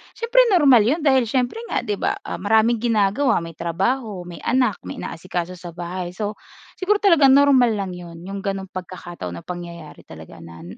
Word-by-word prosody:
Siyempre 480 +2 +1 0.2
normal 270 -9 +6
yun 300 +8 +1
dahil 265 -4 +4
siyempre 255 - -1
nga, - - -2
'di 210 -4 -2
ba, - - 0
ah, - - -6
maraming 220 +3 +3
ginagawa, 225 +1 +1
may 165 -1 -9
trabaho, 195 +4 -2
may 175 -1 -10
anak, 250 -6 +1
may - - -6
inaasikaso 180 +1 -5
sa 175 -2 -10
bahay. 175 +1 -5
So, 210 0 -4 0.4
siguro 410 +2 +1
talagang 310 -9 +5
normal 265 -5 +5
lang 195 -2 -3
'yon, 170 -1 -10
yung 195 +1 -6
ganong 195 -1 -4
pagkakataon 175 - -7
o - - -25
pangyayari 170 -3 -9
talaga 80 -1 -12
na 85 0 -12
200 Hz, 180 wpm, -21 LUFS, 175-255 Hz, 0.4 s, normal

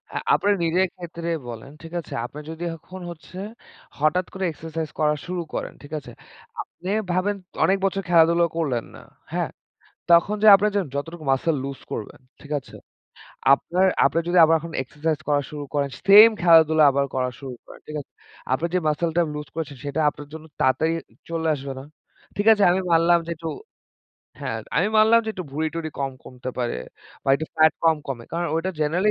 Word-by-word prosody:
আ - - 0 0.2
আপনার 205 +1 +3
নিজের 180 +3 +2
ক্ষেত্রে 170 -1 -6 0.2
বলেন, 120 +4 -8
ঠিক 165 +1 -10
আছে? 165 - -9
আপনি 140 +4 -9
যদি 165 +1 -6
এখন 185 +3 -11
হচ্ছে 170 +2 -12 0.6
হঠাৎ 155 +5 +2
করে 190 - -4
এক্সারসাইজ 160 0 -5
করা 150 -1 +3
শুরু 180 0 -3
করেন, - - -4
ঠিক 145 +2 -11
আছে? 125 -4 -12 0.5
আপনি 180 +2 -9 0.2
ভাবেন 185 +3 +1 0.3
অনেক 195 - +3
বছর 195 0 0
খেলাধুলা 170 0 +5
করলেন 130 -8 -1
না। - - -12 0.3
হ্যাঁ? - - -1 0.6
তখন 170 +5 +5
যে - - +6
আপনি 200 +2 +2
যেন 200 -3 +1
যতটুকু 165 +3 -5
মাসেল 150 +4 +1
লুজ 135 -3 -5
করবেন। 105 - -6 0.2
ঠিক 150 - -12
আছে? 130 - -16 0.8
আপনার 180 +6 0 0.2
আপনার 165 - +2
যদি 180 +1 +3
আবার 165 - +4
এখন 170 0 -8
এক্সারসাইজ 150 +3 -2
করা 145 -1 +3
শুরু 150 -1 -6
করেন 140 -1 +1 0.2
সেম 210 +3 +10
খেলাধুলা 160 -2 +6 0.3
করা 130 -1 0
শুরু 135 -3 -7
করেন। - - -14
ঠিক 155 - -6
আছে? - - -39 0.4
আপনি 145 +6 +1
যে - - +4
মাসলটা 165 +3 +1
লুজ 150 0 -5
করেছেন 155 -3 -5
সেটা 145 +2 -2
আপনার 145 0 -12
জন্য 160 0 -9 0.2
তাড়াতাড়ি 130 +5 +2 0.4
চলে 165 -1 -1
আসবে 140 -1 -6
না। - - -10 0.5
ঠিক 205 - -1
আছে? 210 -2 +2
আমি 185 +2 +2
মানলাম 170 +1 +5
যে - - -5
একটু 165 +1 -5 0.9
হ্যাঁ, - - -3 0.2
আমি - - +3
মানলাম 220 +2 +6
যে - - -5
একটু 185 -4 -6
ভুড়ি-টুরি 160 +2 -3
কম 135 -1 -1
কমতে 125 0 -7
পারে 120 -1 -1 0.5
বা - - -5
একটু 160 +3 -3
ফ্যাট 155 0 +6
কম, 160 -1 +5
কমে 120 -4 -5
কারন 170 +1 -1
ওটা 175 +3 -1
জেনারেলি 175 +7 +2
160 Hz, 180 wpm, -23 LUFS, 145-175 Hz, 0.9 s, সেম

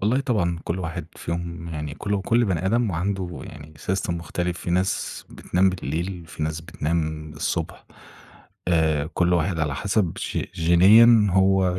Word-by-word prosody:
والله 115 +7 +2
طبعًا 90 -11 0
كل 85 +3 -2
واحد 85 -2 -4
فيهم 85 0 -5
يعني 75 -3 -5
كل 100 +1 -2
كل 120 +3 +3
بني 95 -3 -1
آدم 115 +1 +2
وعنده 90 0 -3
يعني 75 0 -11
system 95 +3 -2
مختلف. 85 +1 -3
في - - -5
ناس 90 +2 -1
بتنام 95 +2 +1
بالليل 90 +1 -4
في 80 - -7
ناس 80 +1 -2
بتنام 80 -1 -3
الصبح. - - -3 0.8
آآ 80 -3 +2
كل 90 0 +2
واحد 85 0 +1
على 75 -3 0
حسب 100 +2 0
ج - - -3
جينيًا 105 +7 +6
هو 95 -1 +3
85 Hz, 155 wpm, -24 LUFS, 80-95 Hz, 0.8 s, جينيًا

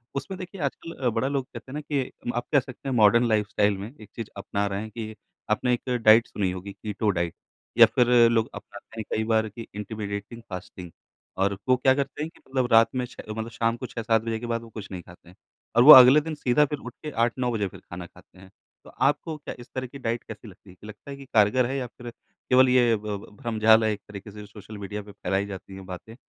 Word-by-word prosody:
उसमें, 140 +8 -4
देखिए, 185 0 -8
आजकल 150 +4 -4
अ, 130 -2 0
बड़ा 115 +3 -1
लोग 135 -2 -1
कहते 130 - -11
हैं - - -8
ना 150 - -4
कि 145 -3 -2 0.2
आप 120 0 -2
कह 145 - +5
सकते 130 +1 -10
हैं, 130 - -1
मॉडर्न 115 +2 +5
लाइफ़स्टाइल 105 -2 +1
में 105 +6 -8
एक 105 -2 -13
चीज़ 115 -2 -5
अपना 100 +1 -2
रहे 100 0 -3
हैं 110 - -7
कि 110 0 -7 0.4
आपने 125 +4 +2
एक 120 - -3
डाइट 115 -2 +5
सुनी 95 -3 -2
होगी, 95 +2 -7
कीटो 105 +1 -3
डाइट, 85 -1 -1 0.4
या 115 - +10
फिर 125 -2 +4 0.2
लोग 115 -1 +1
अपनाते 115 -1 -11
हैं - - -2
कई 110 - 0
बार, 110 0 +1
कि 115 +2 -10
इंटिमिडेटिंग 105 +2 -6
फास्टिंग। 90 -2 -8 0.5
और 100 0 0
वो 130 - +6
क्या 130 +1 +4
करते 140 +1 -3
हैं 155 - -4
कि - - -20
मतलब 130 -2 0
रात 115 0 +6
में 125 -1 0
6 125 - -11
अ, - - -9
मतलब 110 +1 -4
शाम 115 +1 0
को 130 - -6
6-7 115 -2 0
बजे 115 -1 -2
के 120 - -6
बाद, 115 -1 -2
वो 115 - -12
कुछ 105 -2 -9
नहीं 90 -2 -6
खाते 85 0 -17
हैं। 90 - -17 0.4
और 120 - +6
वो 150 - +11
अगले 130 +4 +9
दिन 160 +1 -5
सीधा 145 +1 +3
फिर 145 0 -5
उठ 125 -2 -9
के, 155 - -5
8-9 120 +1 0
बजे 105 -4 -1
फिर - - -12
खाना 90 0 -9
खाते 90 - -21
हैं। 95 0 -15 0.3
तो - - -14
आपको 160 - +1
क्या 150 - -7
इस 120 +1 -12
तरह 130 -1 -3
की 140 - -11
डाइट 115 -1 -2
कैसी 110 +1 -10
लगती 100 0 -16
है? 90 - -14
क्या 105 +4 -14
लगता 110 +6 -11
है 140 - -7
कि 140 - -11
कारगर 110 +4 +4
है, 135 +3 -2
या 125 -2 -3
फिर 120 -1 -8 0.4
केवल 130 0 +6
ये 120 -2 +4
ब 105 -1 -4
ब - - -18
भ्रमझाल 110 -1 +4
है, 110 - +2
एक 105 -1 -5
तरीके 105 +1 -9
से 105 0 -10
सोशल 105 +1 -11
मीडिया 105 +1 -5
पे 105 - -12
फ़ैलाई 95 +1 -2
जाती 95 -1 -9
हैं 95 0 -10
बातें? 95 +5 -9
115 Hz, 255 wpm, -25 LUFS, 105-125 Hz, 0.5 s, वो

